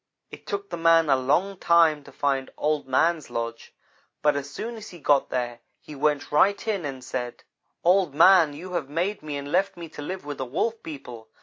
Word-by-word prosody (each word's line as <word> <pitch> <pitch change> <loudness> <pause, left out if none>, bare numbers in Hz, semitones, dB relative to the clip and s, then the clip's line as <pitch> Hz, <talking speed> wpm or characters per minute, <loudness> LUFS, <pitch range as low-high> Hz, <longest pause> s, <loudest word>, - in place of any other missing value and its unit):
"It - - -12
took 200 -1 -4
the 170 - -3
man 165 -2 +4
a - - +6
long 170 +10 +1
time 165 -3 +4
to 140 - -13
find 135 -1 -1
Old 150 -2 -1
man's 160 +5 +1
lodge, 115 0 -5 0.5
but 150 -1 +4
as 140 0 -4
soon 230 +10 -5
as 220 -1 -9
he 175 - -11
got 145 -3 +2
there 120 -2 -3 0.2
he 150 - -12
went 145 0 0
right 200 +9 +3
in 200 -7 -1
and 135 -3 -6
said: 125 -1 -5 0.4
"'Old 180 -4 +3
man, 165 -2 +6
you 180 +5 -9
have 160 -6 -2
made 180 +7 -2
me 150 -2 -5
and 140 +1 -6
left 190 +1 +1
me 170 -1 -7
to 150 - -9
live 185 +3 -6
with 145 -1 -6
the 130 - -2
Wolf 220 - -2
people. 120 -7 -9
150 Hz, 210 wpm, -25 LUFS, 140-175 Hz, 0.5 s, a